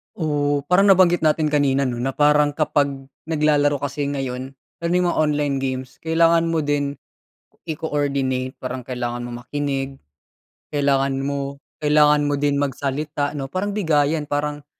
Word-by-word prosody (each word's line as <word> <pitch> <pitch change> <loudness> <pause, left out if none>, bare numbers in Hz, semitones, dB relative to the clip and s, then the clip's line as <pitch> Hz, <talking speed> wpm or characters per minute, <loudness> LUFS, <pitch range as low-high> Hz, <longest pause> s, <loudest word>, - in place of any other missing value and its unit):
Oh, 145 -3 0
parang 195 +3 +5
nabanggit 180 -4 +5
natin 155 0 +2
kanina, 140 -2 +2
'no, 120 - -4
na 135 +3 -2
parang 150 0 +3
kapag 145 -1 +2 0.4
naglalaro 150 -3 +2
kasi 145 +1 -2
ngayon, 135 -2 -4 0.2
lalo 170 0 -3
na 180 - +3
mga - - -2
online 150 -2 +1
games, 130 -1 -4
kailangan 165 +1 +3
mo 160 - +1
din 145 -1 -1 0.7
i-coordinate, 140 -5 -1
parang 130 0 -5
kailangan 120 -1 -3
mong 120 0 -8
makinig, 135 -2 -3 0.7
kailangan 135 -1 +1
mo 140 0 -4 0.2
kailangan 150 0 +4
mo 145 - 0
din 145 -1 +2
magsalita 145 +2 -2
'no, 135 - -3
parang 185 +8 -3
bigayan, 160 -6 +1
parang 145 0 -3
145 Hz, 140 wpm, -22 LUFS, 135-150 Hz, 0.7 s, parang